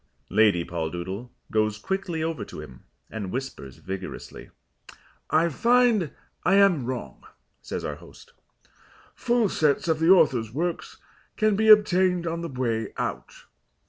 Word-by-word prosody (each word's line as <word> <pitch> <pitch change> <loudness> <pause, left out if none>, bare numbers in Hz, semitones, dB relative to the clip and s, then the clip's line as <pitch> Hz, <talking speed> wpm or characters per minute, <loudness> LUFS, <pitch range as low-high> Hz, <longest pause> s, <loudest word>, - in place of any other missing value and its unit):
Lady 100 -5 +3
Poldoodle 90 +7 -5 0.2
goes 110 -1 +1
quickly 180 - -3
over 165 -1 -3
to - - -10
him 65 -1 -12 0.3
and 105 -4 -5
whispers 120 - -6
vigorously. 95 +4 -8 0.8
"I 160 +2 +3
find 235 - +3 0.3
I 195 - +3
am 185 -11 +4
wrong," 120 - -6 0.4
says - - -5
our - - -4
host. - - -16 0.8
"Full 240 -2 +1
sets 155 -4 +1
of 160 -1 +1
the 165 +1 +2
author's 135 - +4
works 170 +6 -3 0.4
can 215 -2 +2
be 220 +2 +1
obtained 185 -4 +5
on 165 0 -3
the 170 - -5
way 115 -5 -2
out. - - -5
155 Hz, 135 wpm, -25 LUFS, -, 0.8 s, obtained